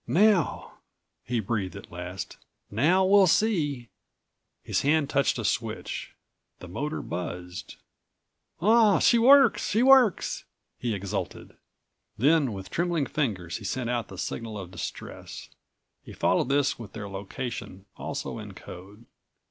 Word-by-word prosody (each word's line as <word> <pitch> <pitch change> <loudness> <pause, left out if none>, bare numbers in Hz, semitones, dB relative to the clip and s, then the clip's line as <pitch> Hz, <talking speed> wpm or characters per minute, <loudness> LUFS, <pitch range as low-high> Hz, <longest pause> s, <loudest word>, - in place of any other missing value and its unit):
"Now," 200 -2 +2 0.4
he 120 -1 -1
breathed 100 -3 -2
at - - -11
last, 90 +2 -6 0.3
"now 165 - +3
we'll 195 0 +6
see!" 150 - +1 0.7
His - - 0
hand 145 0 +2
touched 140 -1 +2
a - - -3
switch. - - -3 0.4
The 90 - -10
motor 150 - -4
buzzed. 90 +1 -6 0.8
"Ah! 215 +2 +5
She 235 - +4
works! 270 0 +6
She 225 +4 +2
works!" 260 -6 +4 0.3
he 120 -3 -1
exulted. 100 -2 -5 0.6
Then 140 +2 +3
with 95 -2 -8
trembling 170 -4 0
fingers 100 - -2
he 115 - -11
sent 120 +4 -2
out 120 -2 -1
the 95 - -10
signal 110 +3 -4
of 95 -3 -8
distress. 90 - -7 0.5
He - - -11
followed - - +1
this 140 -2 +1
with 115 -4 -9
their 105 -2 -6
location, 100 0 -6
also - - -5
in - - -9
code. 100 +6 -12
125 Hz, 130 wpm, -27 LUFS, -, 0.8 s, we'll